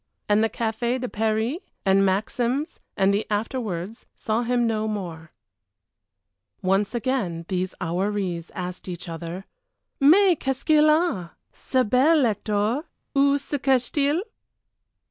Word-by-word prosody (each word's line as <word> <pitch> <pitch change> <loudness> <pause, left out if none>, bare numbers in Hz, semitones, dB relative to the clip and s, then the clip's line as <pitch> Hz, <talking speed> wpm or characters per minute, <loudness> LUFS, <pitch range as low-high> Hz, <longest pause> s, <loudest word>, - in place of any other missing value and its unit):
And 210 +1 +3
the 225 - +2
Café 235 +3 -1
de 250 - -3
Paris 220 +5 0 0.3
and 195 0 +4
Maxims 240 - -1 0.2
and 195 0 +3
the 205 +2 -1
afterwards 210 -2 -3
saw 220 +1 -1
him 240 0 +1
no 220 -1 0
more. 170 -6 -5 1.3
Once 195 +4 +1
again 230 -10 -1
these 185 -1 -2
houris 185 -1 -2
asked 180 -1 -6
each 180 0 -6
other, 170 +3 -6 0.5
"Mais 350 +5 +6
qu'est 270 -1 -1
ce - - -13
qu'il 305 -1 +5
a! 305 - +1 0.2
Ce 260 -1 0
bel 265 +7 +4
Hector? 215 - 0 0.3
Oú 280 0 +4
se 280 +1 -4
cache 255 -2 +2
t 285 -2 +2
il?" 325 +6 0
220 Hz, 135 wpm, -24 LUFS, 190-260 Hz, 1.3 s, Mais